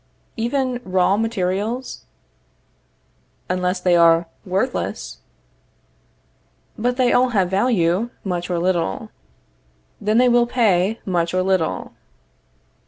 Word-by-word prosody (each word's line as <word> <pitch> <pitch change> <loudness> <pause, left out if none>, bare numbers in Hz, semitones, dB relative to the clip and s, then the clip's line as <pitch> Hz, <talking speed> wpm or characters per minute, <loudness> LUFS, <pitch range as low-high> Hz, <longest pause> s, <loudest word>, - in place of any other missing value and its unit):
Even 250 +1 -1
raw 185 +1 +2
materials? 220 - -2 1.5
Unless 180 0 -1
they 180 -1 +3
are 170 0 +5 0.2
worthless. - - -2 1.6
But 245 +3 -1
they 255 -2 +3
all 255 +1 +4
have 190 -6 0
value, 195 -1 +1
much 175 -2 -3
or 175 - -1
little. 170 - -1 0.9
Then 215 +2 +1
they 250 +1 +5
will 240 0 +4
pay 215 -3 +1
much 175 -2 -1
or 185 - +2
little. 185 -4 -1
190 Hz, 105 wpm, -21 LUFS, 180-235 Hz, 1.6 s, are